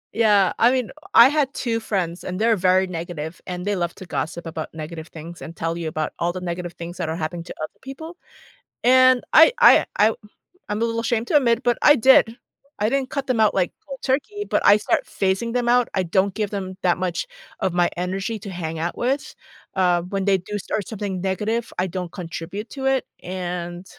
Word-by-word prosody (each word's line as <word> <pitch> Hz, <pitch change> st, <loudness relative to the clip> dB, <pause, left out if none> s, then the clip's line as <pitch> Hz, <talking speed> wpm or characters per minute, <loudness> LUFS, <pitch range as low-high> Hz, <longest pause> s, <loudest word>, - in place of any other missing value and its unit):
Yeah. 205 Hz, -4 st, +4 dB
I 235 Hz, -, +6 dB
mean, 255 Hz, -3 st, -1 dB, 0.2 s
I 235 Hz, -, +10 dB
had 290 Hz, -2 st, +1 dB
2 230 Hz, -3 st, -1 dB
friends 180 Hz, -5 st, -2 dB
and 185 Hz, 0 st, -4 dB
they’re 225 Hz, +1 st, +3 dB
very 185 Hz, +1 st, +4 dB
negative 160 Hz, -1 st, -6 dB, 0.2 s
and 180 Hz, 0 st, -4 dB
they 205 Hz, 0 st, 0 dB
love 170 Hz, -, -3 dB
to 185 Hz, -, -8 dB
gossip 160 Hz, +5 st, -3 dB
about 160 Hz, -1 st, -5 dB
negative 160 Hz, 0 st, -8 dB
things 165 Hz, +2 st, -9 dB
and 160 Hz, -, -7 dB
tell 165 Hz, 0 st, 0 dB
you 160 Hz, -, -3 dB
about 155 Hz, -1 st, -2 dB
all 170 Hz, +1 st, +1 dB
the 185 Hz, -, -6 dB
negative 175 Hz, 0 st, -5 dB
things 170 Hz, +1 st, -6 dB
that 165 Hz, -3 st, -3 dB
are -, -, -2 dB
happening 170 Hz, +2 st, -4 dB
to -, -, -7 dB
other 155 Hz, -, -8 dB
people. 295 Hz, +5 st, -8 dB, 0.7 s
And 255 Hz, 0 st, +6 dB, 0.2 s
I 325 Hz, -, +10 dB
I 485 Hz, -, +9 dB, 0.3 s
I 220 Hz, -, +3 dB, 0.6 s
I’m 210 Hz, -, -1 dB
a 230 Hz, -, +2 dB
little 230 Hz, 0 st, -2 dB
ashamed 235 Hz, -1 st, 0 dB
to 300 Hz, -, +3 dB
admit, 235 Hz, -4 st, +2 dB
but 240 Hz, -, +3 dB
I 295 Hz, -, +8 dB, 0.2 s
did. -, -, +8 dB, 0.5 s
I 210 Hz, -, +1 dB
didn’t 270 Hz, 0 st, -1 dB
cut 275 Hz, -1 st, -1 dB
them 245 Hz, -3 st, +1 dB
out 210 Hz, -, +3 dB
like 180 Hz, -, 0 dB
cold 270 Hz, -2 st, -8 dB
turkey, 300 Hz, +10 st, -1 dB
but -, -, +2 dB
I 205 Hz, -, +8 dB
start 210 Hz, -, 0 dB, 0.2 s
phasing 195 Hz, +4 st, +1 dB
them 245 Hz, -1 st, 0 dB
out. 245 Hz, -1 st, +3 dB
I -, -, -1 dB
don’t 190 Hz, 0 st, +3 dB
give 210 Hz, -2 st, 0 dB
them 195 Hz, -, -3 dB, 0.2 s
that 175 Hz, -, +3 dB
much 175 Hz, -, -4 dB, 0.5 s
of 190 Hz, -, +1 dB
my -, -, +3 dB, 0.2 s
energy 195 Hz, +4 st, -3 dB
to 200 Hz, -, -6 dB
hang 160 Hz, +1 st, -3 dB
out 175 Hz, -, -3 dB
with. 270 Hz, +3 st, +1 dB, 0.6 s
Um, 175 Hz, -1 st, +3 dB
when 195 Hz, -1 st, 0 dB
they 195 Hz, -1 st, +4 dB
do 210 Hz, -, -5 dB
start 210 Hz, -, -2 dB
something 205 Hz, -3 st, -4 dB, 0.2 s
negative, 220 Hz, +5 st, -1 dB, 0.2 s
I -, -, 0 dB
don’t 180 Hz, -2 st, -4 dB
contribute 175 Hz, +6 st, -6 dB
to 270 Hz, -, -5 dB
it -, -, -3 dB, 0.5 s
and, 175 Hz, +1 st, -6 dB
195 Hz, 215 wpm, -22 LUFS, 175-235 Hz, 0.7 s, I